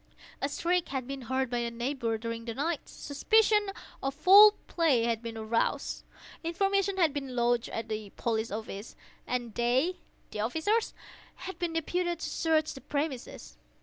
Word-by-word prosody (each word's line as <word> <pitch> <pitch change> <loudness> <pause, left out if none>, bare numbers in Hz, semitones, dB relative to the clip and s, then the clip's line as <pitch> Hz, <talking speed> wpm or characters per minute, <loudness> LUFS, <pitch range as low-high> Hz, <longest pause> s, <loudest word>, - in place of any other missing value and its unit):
A 275 - 0
shriek 345 +4 0
had 265 -2 -3
been 275 0 -5
heard 260 +1 -1
by 245 - 0
a 235 0 -1
neighbour 235 -1 -2
during 230 0 -5
the 230 -1 -4
night; 310 +4 -2
suspicion 420 +8 +2 0.3
of 270 0 -2
foul 400 +7 +9
play 305 -9 +2
had 230 -1 0
been 230 -1 -6
aroused; 220 +1 -1 0.4
information 390 +3 +1
had 330 -6 +3
been 270 -3 -4
lodged 240 -1 +1
at 225 0 -4
the 215 -1 -4
police 225 -1 -1
office, 215 0 -6 0.3
and 245 -3 -2
they 255 - +1 0.3
(the 210 - -6
officers) 320 - 0 0.5
had 380 - -7
been 345 -2 -1
deputed 345 +2 -1
to - - -3
search 315 -1 +1
the 270 - -10
premises. 285 - -4
270 Hz, 160 wpm, -30 LUFS, 235-335 Hz, 0.5 s, foul